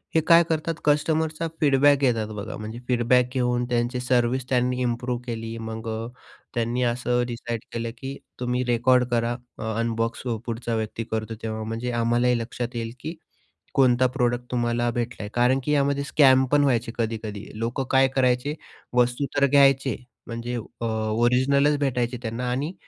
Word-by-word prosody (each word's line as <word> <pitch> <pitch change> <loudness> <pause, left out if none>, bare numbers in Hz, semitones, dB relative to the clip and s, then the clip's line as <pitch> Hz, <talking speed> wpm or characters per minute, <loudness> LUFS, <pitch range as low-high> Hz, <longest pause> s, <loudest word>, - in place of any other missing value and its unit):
हे 160 - +5
काय 165 +2 +6
करतात 160 +1 0
कस्टमरचा 155 +2 +1
फीडबॅक 145 -2 +4
घेतात 120 -6 +1
बघा 105 +2 -5
म्हणजे 110 +2 -7
फीडबॅक 125 0 +3
घेऊन 125 -2 +1
त्यांची 120 +1 0
सर्व्हिस 125 0 +1
त्यांनी 125 0 +1
इम्प्रूव्ह 120 0 -1
केली. 115 -1 -5
मग 110 0 -6
अ, 110 +1 -3 0.5
त्यांनी 120 +1 0
असं 125 0 0
डिसाईड 120 -1 -4
केलं 115 0 -3
की 135 +2 -6 0.2
तुम्ही 125 0 0
रेकॉर्ड 125 +1 +3
करा, 120 0 +1 0.4
अनबॉक्स 115 0 -1 0.2
पुढचा 115 0 -3
व्यक्ती 110 +1 -3
करतो, 110 0 -2
तेव्हा 110 -1 -3
म्हणजे 115 +3 -3
आम्हालाही 120 +1 +2
लक्षात 120 +1 -5
येईल 115 -1 -3
की 160 +6 -6 0.6
कोणता 130 -2 +4
प्रॉडक्ट 125 -1 -1
तुम्हाला 120 -1 0
भेटला 120 0 -3
आहे. 105 - -6
कारण 125 +2 +3
की 150 - -1
यामध्ये 140 -1 +2
स्कॅमपण 140 0 +4
व्हायचे 120 -4 +1
कधी-कधी. 110 -3 -3
लोकं 120 +4 -1
काय 135 0 +5
करायचे? 130 +2 +2 0.4
वस्तू 125 +3 +2
तर 140 - +5
घ्यायचे 135 -3 +4 0.3
म्हणजे 115 +1 -4 0.3
अ, - - -1
ओरिजिनलच 125 +6 +2
भेटायचे 125 -3 0
त्यांना 120 +1 -3
आणि 140 +7 -2
125 Hz, 150 wpm, -25 LUFS, 115-130 Hz, 0.6 s, काय